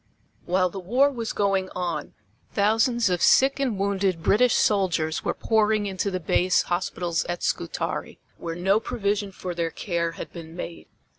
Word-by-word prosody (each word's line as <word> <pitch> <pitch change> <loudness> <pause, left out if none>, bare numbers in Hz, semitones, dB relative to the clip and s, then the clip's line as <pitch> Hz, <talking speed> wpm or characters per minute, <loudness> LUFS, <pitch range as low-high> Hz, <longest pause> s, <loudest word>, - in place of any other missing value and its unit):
While 180 0 +2
the 195 - -6
war 250 +10 +3
was 230 -4 -4
going 195 -2 0
on 175 -4 -3 0.4
thousands 225 +3 +2
of 180 -2 0
sick 270 +1 +5
and 255 -7 0
wounded 195 -3 0
British 245 +6 +4
soldiers 175 -6 +1
were - - -1
pouring 215 -1 +2
into 195 0 -2
the 185 -1 -2
base 180 +2 +2
hospitals 175 -1 -1
at 175 0 -4
Scutari, 85 - -2 0.2
where 165 -1 -5
no 190 +4 +2
provision 205 -2 -2
for 185 -1 -6
their 170 -1 -1
care 170 -1 -2
had - - -8
been 165 -1 -9
made. 170 -1 -7
190 Hz, 160 wpm, -25 LUFS, 175-210 Hz, 0.4 s, sick